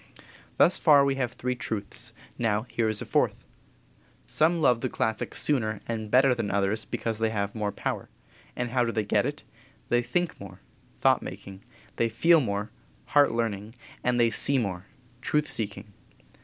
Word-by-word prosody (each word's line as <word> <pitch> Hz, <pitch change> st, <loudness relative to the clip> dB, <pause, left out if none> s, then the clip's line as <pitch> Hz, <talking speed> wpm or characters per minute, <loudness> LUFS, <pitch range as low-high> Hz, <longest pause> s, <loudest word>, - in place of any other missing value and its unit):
Thus 175 Hz, -, +5 dB
far 145 Hz, -4 st, +6 dB
we 140 Hz, -, +2 dB
have 125 Hz, -3 st, -1 dB
three 125 Hz, +1 st, -2 dB
truths; 110 Hz, -4 st, -5 dB, 0.3 s
now 110 Hz, -2 st, +1 dB
here 115 Hz, -2 st, -1 dB
is 110 Hz, -1 st, -2 dB
a -, -, -9 dB
fourth: -, -, 0 dB, 0.8 s
Some 165 Hz, +2 st, +2 dB
love 125 Hz, -6 st, +3 dB
the 130 Hz, -, -1 dB
classics 110 Hz, -1 st, -1 dB
sooner 110 Hz, -8 st, 0 dB
and 110 Hz, -2 st, -4 dB
better 130 Hz, +3 st, +5 dB
than 115 Hz, -4 st, -3 dB
others 100 Hz, +2 st, 0 dB
because 115 Hz, -1 st, -3 dB
they 110 Hz, 0 st, +1 dB
have 100 Hz, -2 st, -2 dB
more 105 Hz, -2 st, -2 dB
power. -, -, -4 dB, 0.5 s
And 125 Hz, -1 st, -3 dB
how 125 Hz, -1 st, +2 dB
do 115 Hz, -, -1 dB
they 110 Hz, -2 st, -1 dB
get 105 Hz, +4 st, +2 dB
it? 145 Hz, +1 st, -6 dB, 0.5 s
They 120 Hz, 0 st, +3 dB
think 170 Hz, +8 st, -2 dB
more 95 Hz, -2 st, -10 dB, 0.4 s
(thought -, -, +3 dB
making); 95 Hz, 0 st, -9 dB, 0.4 s
they 115 Hz, -, +2 dB
feel 165 Hz, +8 st, +4 dB
more 105 Hz, -2 st, -3 dB, 0.4 s
(heart 145 Hz, -1 st, +6 dB
learning); 110 Hz, -1 st, -3 dB, 0.3 s
and 125 Hz, 0 st, +1 dB
they 115 Hz, -1 st, +4 dB
see 140 Hz, +6 st, +3 dB
more 100 Hz, -5 st, -3 dB, 0.3 s
(truth 150 Hz, +2 st, +1 dB
seeking). 105 Hz, -1 st, -4 dB
115 Hz, 170 wpm, -27 LUFS, 105-125 Hz, 0.8 s, far